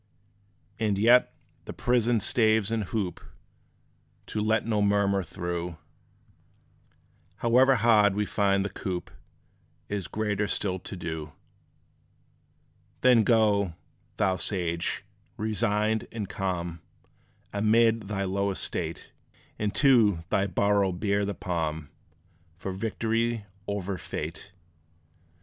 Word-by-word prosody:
And 105 -3 +1
yet, 120 +5 +5 0.3
the - - -6
prison 120 -1 +2
staves 110 -3 +2
and 110 -2 0
hoop 95 -3 -3 1.0
To 105 - -3
let 110 +1 +1
no 110 -2 +1
murmur 100 -1 +2
through, 85 -2 -4 1.6
However 130 +3 +4
hard 110 -4 +4
we 105 0 0
find 100 -1 +1
the 100 - -3
coop, 90 -2 -5 0.8
Is 100 -4 -3
greater 105 -1 -1
still 95 -2 -1
to 95 - -8
do. 80 -4 -5 1.7
Then 125 -3 +6
go, 105 -6 +3 0.4
thou 95 -1 +2
sage, 85 -3 -2 0.3
resigned 110 0 0
and 110 -3 -4
calm; 90 -4 -3 0.7
Amid 110 +1 +3
thy 100 -1 -2
low 100 +1 0
estate, 95 - -4 0.5
And 105 -1 0
to 110 - +4
thy 100 -2 +2
burrow 100 +1 +2
bear 100 +3 0
the 100 -1 -3
palm 80 -4 -3 0.7
For 95 +2 -5
victory 115 +2 -1 0.2
over 100 -2 -3
fate. 80 +6 -6
100 Hz, 105 wpm, -27 LUFS, 95-110 Hz, 1.7 s, Then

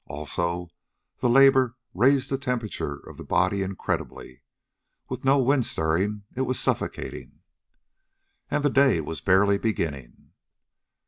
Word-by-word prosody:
Also 85 +4 -3 0.5
the 125 - +1
labor 130 -1 +5 0.2
raised 130 +6 +2
the 135 - +1
temperature 115 - -3
of - - -11
the - - -8
body 100 -1 +1
incredibly. 95 -8 -5 0.7
With 130 -1 -5
no 135 +1 +4
wind 135 -1 +2
stirring 95 +7 -1
it 130 - -2
was 130 -1 0
suffocating. - - -3 1.1
And 150 - -1
the 145 - +3
day 135 -10 +4
was 80 +1 -5
barely 100 +2 +3
beginning! 70 - -4
105 Hz, 125 wpm, -25 LUFS, 85-130 Hz, 1.1 s, labor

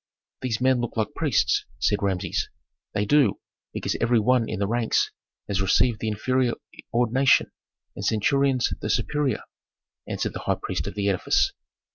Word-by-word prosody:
"These 120 -5 -1
men 130 -1 +3
look 120 - -4
like 110 +6 -1
priests," 140 -10 +1
said 100 +12 +1
Rameses. 95 -2 -1 0.5
"They 105 0 +1
do, 135 -3 +3 0.3
because - - -2
every 115 0 +3
one 120 +1 +2
in 110 - -3
the 100 - 0
ranks 115 +2 +1 0.4
has 100 -1 0
received 105 +4 +3
the 110 - -3
inferior 120 +3 +1 0.4
ordination, 125 +3 +3 0.4
and - - -6
centurions 130 +4 +2
the 105 - -3
superior," 135 +2 0 0.6
answered - - -2
the - - -5
high - - -1
priest - - -3
of - - -6
the 100 -1 -1
edifice. 95 -2 +2
115 Hz, 155 wpm, -25 LUFS, 105-130 Hz, 0.6 s, men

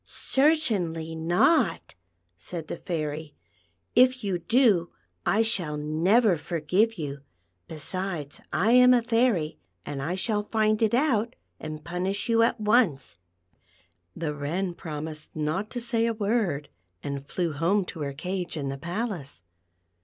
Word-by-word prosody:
"Certainly 210 - +1
not," 175 - +2 0.4
said 160 - -7
the - - -3
Fairy; 155 -2 -4 0.3
" 85 +1 -45
if 255 0 +5
\'ou 190 -3 -1
do, 210 -7 +3 0.4
I 210 +6 +4
shall 175 -10 -1
never 175 +7 +3
forgive 180 +8 0
you; 145 -3 -4 0.5
besides, 160 -1 -3
I 210 +6 +2
am 250 0 +7
a 240 - +2
fairy, 225 -9 +1 0.3
and 140 -2 -4
I 165 +6 -2
shall 210 +2 0
find 215 0 +1
it 225 +1 +3
out 245 -4 +1 0.2
and 155 -1 -7
punish 185 +5 -2
you 230 0 +4
at 230 +1 +2
once." 210 - +2 1.0
The 155 -3 -3
Wren 170 +6 -2
promised 155 -1 -7
not 155 +7 -2
to 245 - -4
say 230 -1 +1
a 230 - -1
word, 200 -9 -1 0.3
and 140 -1 -4
flew 170 +2 -2
home 175 +7 +1
to 170 - -8
her 140 -2 -3
cage 180 +3 -4
in 140 -2 -3
the 135 0 -5
palace. 170 - -4
180 Hz, 140 wpm, -26 LUFS, 155-225 Hz, 1.0 s, am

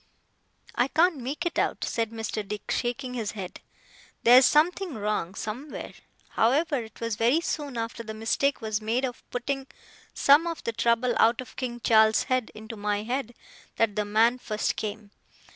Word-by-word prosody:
'I 245 - +2
can't 325 +3 +3
make 270 +7 -4
it 345 - -1
out,' - - 0
said 230 -2 -1
Mr. 220 -2 -4
Dick, 210 0 -5
shaking 250 +1 -2
his 225 -4 -3
head. 190 -4 -7 0.6
'There's 250 +2 +8
something 340 +1 +2
wrong, 205 -4 -2
somewhere. 250 +10 -6 0.4
However, 285 +6 +2
it 220 -1 -12
was 230 -2 -2
very 240 +8 +3
soon 290 -6 -3
after 230 0 -4
the 220 -1 -7
mistake 235 +6 0
was 215 -1 -2
made 230 +5 0
of 245 -2 -6
putting 270 +2 -3 0.5
some 290 +5 +5
of 335 -1 -4
the 230 - -2
trouble 235 +2 +2
out 230 +1 +4
of 255 - -8
King 240 -2 -4
Charles's 220 -1 +5
head 255 -3 0
into 220 +2 -8
my 205 0 -1
head, 245 0 -3 0.4
that 225 -3 +1
the 210 - +1
man 225 +4 +3
first 215 -3 -2
came. 210 -1 -5
235 Hz, 170 wpm, -27 LUFS, 220-265 Hz, 0.6 s, There's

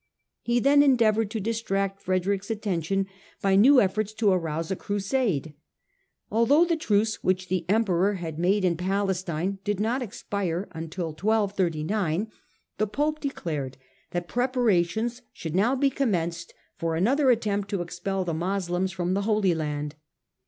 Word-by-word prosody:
He 240 0 +1
then 280 +3 +5
endeavoured 225 -6 +3
to 220 - -3
distract 195 -3 -2
Frederick's 190 +2 -1
attention 195 -3 -1 0.3
by 195 -1 +2
new 255 +7 +7
efforts 210 +1 0
to 215 -2 +2
arouse 165 -1 -1
a - - +1
Crusade. 200 - -1 0.8
Although 255 +9 +4
the 335 -1 +1
truce 215 -8 0
which 185 0 0
the 185 -3 -1
Emperor 200 -2 +2
had 165 -4 -5
made 190 +3 +2
in 170 -2 +1
Palestine 190 -1 -1
did 205 -1 -1
not 235 +5 0
expire 200 -5 -3
until 165 +1 -4
1239, 195 0 0 0.5
the 215 - +2
Pope 300 +8 -1
declared 150 - -4 0.3
that 175 0 -3
preparations 240 -2 +1
should 160 -3 -6
now 215 +9 +3
be 275 +1 +2
commenced 170 -10 -1 0.2
for 165 -1 -1
another 260 - +3
attempt 205 -4 +1
to 195 -4 -1
expel 185 +2 -3
the 170 - -2
Moslems 180 +2 -1
from 180 -1 -1
the 200 - +1
Holy 210 -4 +3
Land. 150 -2 -3
195 Hz, 145 wpm, -26 LUFS, 175-220 Hz, 0.8 s, new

